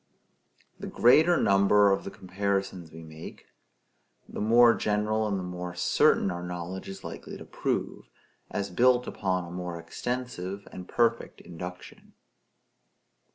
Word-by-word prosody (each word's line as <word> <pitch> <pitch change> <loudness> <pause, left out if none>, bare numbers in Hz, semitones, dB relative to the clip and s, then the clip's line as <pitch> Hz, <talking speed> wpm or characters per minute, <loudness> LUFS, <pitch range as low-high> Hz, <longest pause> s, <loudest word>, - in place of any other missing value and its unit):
The - - -6
greater 160 +8 +5
number 100 -1 +4
of 95 - 0
the - - -4
comparisons 95 -3 -3
we 80 +1 -11
make, 80 0 -11 0.8
the - - -6
more 115 +2 +6
general 105 +1 0
and 100 -2 -1
the 95 - -4
more 90 0 -6
certain 95 +2 +3
our 90 0 -5
knowledge 90 +2 -6
is 95 - -9
likely - - -8
to - - -11
prove, - - -3 0.4
as 100 -2 -3
built 125 +6 +3
upon 95 -2 -2
a 85 - -10
more 90 -1 -5
extensive 100 +2 -5
and 90 0 -9
perfect 115 0 0
induction. 90 +1 -10
95 Hz, 135 wpm, -28 LUFS, 90-110 Hz, 0.8 s, more